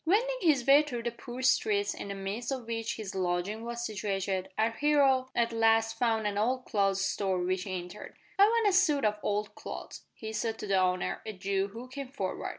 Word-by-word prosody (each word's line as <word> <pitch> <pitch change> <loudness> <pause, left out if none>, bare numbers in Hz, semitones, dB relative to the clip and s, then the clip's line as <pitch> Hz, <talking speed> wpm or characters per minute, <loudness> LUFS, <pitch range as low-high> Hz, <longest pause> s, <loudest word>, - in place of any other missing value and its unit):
Wending 480 +9 +2
his 295 -9 +3
way 280 +2 +7
through 250 -6 -5
the 235 - -1
poor 245 +2 -8
streets 205 -5 +2
in - - -7
the 200 - -4
midst 200 +6 -4
of 260 -3 -3
which 225 -1 -3
his 210 -3 -6
lodging 185 +4 -1
was 235 0 -4
situated, 195 -3 -2
our 220 +1 +2
hero 270 -1 +3
at 235 -1 +1
last 225 0 +3
found 225 -3 +1
an 205 -1 0
old 255 +4 0
clothes 195 -2 +1
store, 195 -1 0
which 185 +1 -1
he 185 -2 -3
entered. 180 +3 -9 0.2
"I 400 - +9
want 455 0 +3
a 400 - +3
suit 310 - +3
of 210 0 +1
old 210 0 -1
clothes," - - -8
he 220 -1 -7
said 225 0 -2
to - - -6
the 195 -2 +2
owner, 185 0 0
a 220 - -5
Jew, 195 0 -1
who 230 +5 -9
came 275 +1 -6
forward. 200 -8 -4
225 Hz, 215 wpm, -30 LUFS, 195-255 Hz, 0.2 s, I